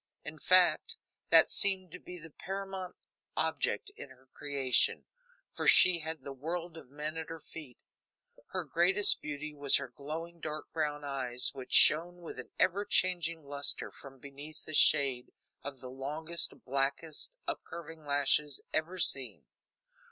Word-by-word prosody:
In 150 Hz, +1 st, -9 dB
fact, 185 Hz, +1 st, +3 dB, 0.3 s
that -, -, +6 dB
seemed 190 Hz, -3 st, +1 dB
to -, -, -10 dB
be 180 Hz, -, -11 dB
the 165 Hz, -2 st, -13 dB
paramount 190 Hz, +1 st, -7 dB, 0.4 s
object 405 Hz, -, -1 dB
in -, -, -9 dB
her 130 Hz, 0 st, -20 dB
creation, 140 Hz, -3 st, 0 dB, 0.5 s
for -, -, -3 dB
she 180 Hz, -2 st, +6 dB
had 160 Hz, 0 st, -6 dB
the 140 Hz, -, -7 dB
world 165 Hz, +5 st, -5 dB
of 160 Hz, -6 st, -13 dB
men 150 Hz, +3 st, -6 dB
at 160 Hz, -, -6 dB
her 165 Hz, 0 st, -7 dB
feet. 150 Hz, -5 st, -12 dB, 0.7 s
Her 185 Hz, -1 st, -4 dB
greatest 175 Hz, +7 st, +7 dB
beauty 150 Hz, 0 st, -6 dB
was 140 Hz, -2 st, +3 dB
her 140 Hz, -2 st, +2 dB
glowing 160 Hz, +6 st, -8 dB
dark 155 Hz, -1 st, -7 dB
brown 150 Hz, -2 st, -2 dB
eyes, 130 Hz, -3 st, +2 dB
which 130 Hz, -2 st, -10 dB
shone 175 Hz, +3 st, +4 dB
with 170 Hz, -, -9 dB
an -, -, -9 dB
ever 185 Hz, +2 st, +1 dB
changing 175 Hz, -5 st, -1 dB
luster 140 Hz, 0 st, -3 dB
from 135 Hz, -1 st, -14 dB
beneath 140 Hz, +3 st, -12 dB
the 155 Hz, -, -8 dB
shade 135 Hz, -5 st, +3 dB, 0.3 s
of 140 Hz, -3 st, -9 dB
the 130 Hz, -1 st, -9 dB
longest, 155 Hz, +6 st, -3 dB
blackest 140 Hz, -, -2 dB
upcurving 165 Hz, -1 st, -7 dB
lashes 145 Hz, 0 st, 0 dB
ever 165 Hz, +4 st, -2 dB
seen. 135 Hz, -7 st, -2 dB
155 Hz, 150 wpm, -31 LUFS, 140-170 Hz, 0.7 s, greatest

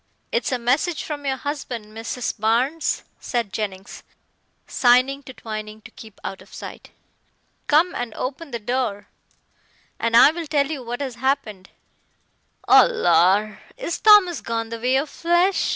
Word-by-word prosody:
"It's 480 Hz, -, -1 dB
a 255 Hz, -, +1 dB
message 275 Hz, +8 st, 0 dB
from 290 Hz, -2 st, -5 dB
your 265 Hz, -1 st, 0 dB
husband, 245 Hz, -7 st, -6 dB
Mrs. 230 Hz, +1 st, -4 dB
Barnes," 245 Hz, +9 st, 0 dB, 0.2 s
said 235 Hz, -6 st, -3 dB
Jennings, 195 Hz, -3 st, -5 dB, 0.6 s
signing 255 Hz, +3 st, +3 dB
to 265 Hz, -2 st, -11 dB
Twining 215 Hz, -1 st, -7 dB
to 225 Hz, -, -14 dB
keep 220 Hz, -2 st, -14 dB
out 195 Hz, -, -6 dB
of -, -, -18 dB
sight. -, -, -10 dB, 0.8 s
"Come 320 Hz, +5 st, +3 dB
and 240 Hz, -2 st, -4 dB
open 280 Hz, +5 st, -5 dB
the 240 Hz, -, -4 dB
door, 230 Hz, -2 st, -3 dB, 0.9 s
and 230 Hz, 0 st, +2 dB
I'll 320 Hz, +6 st, +5 dB
tell 290 Hz, -1 st, +1 dB
you 290 Hz, -4 st, -4 dB
what 245 Hz, +2 st, -5 dB
has 265 Hz, -3 st, -3 dB
happened." 240 Hz, -8 st, -1 dB, 1.0 s
"Oh, -, -, +8 dB
lor! 200 Hz, -, +2 dB, 0.2 s
is 420 Hz, -9 st, -4 dB
Thomas 405 Hz, -, +6 dB
gone 225 Hz, -1 st, -3 dB
the 230 Hz, 0 st, -6 dB
way 250 Hz, +3 st, +1 dB
of 275 Hz, +3 st, +1 dB
flesh?" 345 Hz, +5 st, +1 dB
250 Hz, 150 wpm, -22 LUFS, 225-295 Hz, 1.0 s, Oh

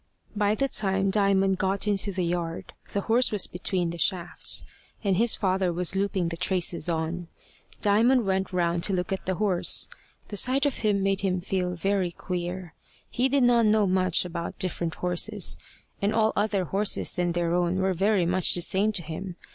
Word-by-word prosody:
By 205 Hz, 0 st, +1 dB
the 275 Hz, +4 st, 0 dB
time 195 Hz, -5 st, +1 dB
Diamond 195 Hz, -2 st, +2 dB
got 195 Hz, +1 st, 0 dB
into 205 Hz, 0 st, 0 dB
the 185 Hz, -2 st, -2 dB
yard, 170 Hz, -1 st, -4 dB, 0.2 s
the 200 Hz, -, -1 dB
horse 235 Hz, +4 st, +2 dB
was 210 Hz, -3 st, +1 dB
between 180 Hz, -1 st, -2 dB
the 170 Hz, -, -7 dB
shafts, 175 Hz, -1 st, +1 dB, 0.4 s
and 195 Hz, -3 st, +2 dB
his 230 Hz, +4 st, +3 dB
father 185 Hz, -2 st, 0 dB
was 175 Hz, +1 st, -2 dB
looping 190 Hz, -3 st, 0 dB
the 165 Hz, -, -4 dB
traces 175 Hz, -2 st, 0 dB
on. 165 Hz, +1 st, -3 dB, 0.6 s
Diamond 230 Hz, +4 st, +3 dB
went 190 Hz, 0 st, -1 dB
round 170 Hz, -2 st, 0 dB
to 200 Hz, -, 0 dB
look 180 Hz, +1 st, -1 dB
at 190 Hz, -, -6 dB
the 185 Hz, -, 0 dB
horse. 190 Hz, -3 st, +1 dB, 0.4 s
The 205 Hz, -, -4 dB
sight 260 Hz, +7 st, +3 dB
of 285 Hz, -, 0 dB
him 205 Hz, -3 st, +1 dB
made 195 Hz, 0 st, +1 dB
him 185 Hz, -2 st, 0 dB
feel 180 Hz, -1 st, -2 dB
very 195 Hz, +1 st, 0 dB
queer. 180 Hz, -1 st, -5 dB, 0.4 s
He 255 Hz, +2 st, +1 dB
did 275 Hz, -1 st, +2 dB
not 240 Hz, -2 st, +4 dB
know 210 Hz, -1 st, +3 dB
much 185 Hz, -2 st, +2 dB
about 170 Hz, -1 st, -5 dB
different 170 Hz, -2 st, -2 dB
horses, 180 Hz, +3 st, -1 dB, 0.5 s
and 205 Hz, +2 st, 0 dB
all 220 Hz, -1 st, +2 dB
other 205 Hz, -2 st, 0 dB
horses 195 Hz, +4 st, 0 dB
than 175 Hz, -1 st, -1 dB
their 170 Hz, -1 st, 0 dB
own 175 Hz, 0 st, +1 dB
were 190 Hz, 0 st, +1 dB
very 195 Hz, 0 st, +1 dB
much 180 Hz, +1 st, +2 dB
the 175 Hz, -, +1 dB
same 200 Hz, +4 st, +3 dB
to 175 Hz, -, -1 dB
him. 170 Hz, +3 st, -6 dB
190 Hz, 185 wpm, -26 LUFS, 175-205 Hz, 0.6 s, not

